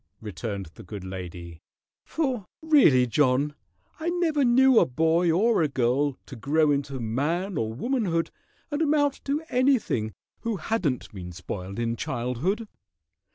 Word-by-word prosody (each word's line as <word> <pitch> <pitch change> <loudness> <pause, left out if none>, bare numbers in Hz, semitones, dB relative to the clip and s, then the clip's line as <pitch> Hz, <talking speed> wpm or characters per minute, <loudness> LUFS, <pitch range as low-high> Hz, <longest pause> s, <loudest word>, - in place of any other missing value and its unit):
returned 105 -1 -5
the - - -12
good 100 0 -8
lady, 90 -3 -8 0.4
"for 260 - -2 0.2
really, 270 - +5
John, 140 +3 +2 0.5
I 325 +2 -1
never 335 -5 +1
knew 255 0 +6
a - - +4
boy 160 +5 +2
or 215 +5 +3
a 155 - +3
girl 135 +1 +1
to - - -9
grow 150 +5 +2
into 140 -1 -1
man 150 - -1
or 110 -5 -1
womanhood 175 - -1 0.4
and 290 +2 -1
amount 290 -2 +2
to 290 +3 -1
anything 245 - +1 0.3
who 230 -2 -2
hadn't 165 - -2
been 90 -3 -7
spoiled 90 +2 -6
in 115 0 -1
childhood. 145 - -2
150 Hz, 140 wpm, -26 LUFS, -, 0.5 s, knew